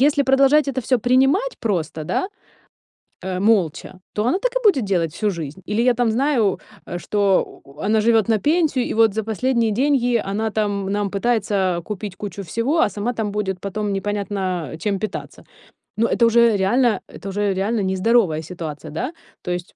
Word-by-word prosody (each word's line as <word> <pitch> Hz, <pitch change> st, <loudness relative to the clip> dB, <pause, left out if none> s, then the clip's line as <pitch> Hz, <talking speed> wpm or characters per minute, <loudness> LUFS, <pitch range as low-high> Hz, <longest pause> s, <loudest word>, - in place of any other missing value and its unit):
Если 285 Hz, 0 st, +3 dB
продолжать 275 Hz, +2 st, +4 dB
это 270 Hz, -, -4 dB
всё 250 Hz, +1 st, +1 dB
принимать 270 Hz, -, +2 dB
просто, 170 Hz, -, -2 dB
да, 370 Hz, -, -1 dB, 1.0 s
э, 185 Hz, -1 st, -3 dB
молча, 185 Hz, -3 st, +1 dB
то 210 Hz, -, -1 dB
она 260 Hz, +10 st, +2 dB
так -, -, 0 dB
и -, -, +3 dB
будет 305 Hz, -, +4 dB
делать 170 Hz, -5 st, 0 dB
всю 210 Hz, -1 st, 0 dB
жизнь. 155 Hz, -2 st, -6 dB
Или 210 Hz, +2 st, +1 dB
я 250 Hz, 0 st, +4 dB
там 235 Hz, -2 st, +1 dB
знаю, 240 Hz, -5 st, +1 dB, 0.3 s
э, 175 Hz, -, -5 dB
что 200 Hz, -1 st, +2 dB, 0.2 s
у 140 Hz, -, -16 dB
у 140 Hz, -, -20 dB
она 215 Hz, +4 st, +1 dB
живёт 225 Hz, 0 st, +3 dB
на 220 Hz, -, +4 dB
пенсию, 300 Hz, -, +1 dB
и -, -, -2 dB
вот 225 Hz, -2 st, +4 dB
за 220 Hz, +1 st, -2 dB
последние 230 Hz, +1 st, 0 dB
деньги 245 Hz, -1 st, +2 dB
она 220 Hz, +2 st, -1 dB
там 205 Hz, -2 st, -1 dB
нам 205 Hz, -1 st, -1 dB
пытается, 220 Hz, +3 st, 0 dB, 0.2 s
а, 170 Hz, -, -4 dB
купить 205 Hz, 0 st, -6 dB
кучу 200 Hz, -1 st, -6 dB
всего, 230 Hz, -, -1 dB
а -, -, +4 dB
сама 215 Hz, +4 st, -3 dB
там 220 Hz, -3 st, -2 dB
будет 195 Hz, -3 st, -2 dB
потом 200 Hz, +1 st, -3 dB
непонятно, 205 Hz, 0 st, -3 dB, 0.3 s
а, -, -, -7 dB
чем 195 Hz, +2 st, -2 dB
питаться. 215 Hz, -2 st, -6 dB, 0.5 s
Ну, 230 Hz, -, +2 dB
это 235 Hz, -, +2 dB
уже 230 Hz, -1 st, +4 dB
реально 215 Hz, +2 st, +2 dB
это 195 Hz, -, -8 dB
уже 205 Hz, 0 st, 0 dB
реально 200 Hz, +3 st, -1 dB
не 190 Hz, 0 st, 0 dB
здоровая 190 Hz, -6 st, +2 dB
ситуация, 155 Hz, -3 st, -7 dB
да? 255 Hz, -, -3 dB, 0.3 s
То 180 Hz, -, -4 dB
есть. 175 Hz, 0 st, -5 dB
215 Hz, 195 wpm, -21 LUFS, 195-245 Hz, 1.0 s, продолжать